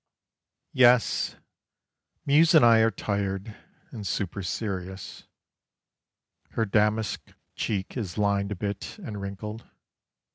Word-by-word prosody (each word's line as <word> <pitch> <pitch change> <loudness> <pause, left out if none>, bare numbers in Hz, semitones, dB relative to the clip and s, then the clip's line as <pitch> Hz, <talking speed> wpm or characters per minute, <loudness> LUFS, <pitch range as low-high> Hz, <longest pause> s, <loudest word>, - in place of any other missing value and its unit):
Yes, 125 -2 +4 0.9
Muse 155 +4 +5
and 150 -6 +8
I 115 -1 +7
are 110 0 +5
tired, 100 0 -3 0.4
and 105 -5 -6
super 100 +1 -2
serious: 95 -1 -5 1.3
Her 115 - +1
damask 105 +1 0 0.2
cheek 100 -3 -3
is 100 -9 -4
lined 100 -1 +1
a - - -2
bit, 100 - -5
and 115 - -7
wrinkled. 105 +3 -6
105 Hz, 105 wpm, -27 LUFS, 100-115 Hz, 1.3 s, and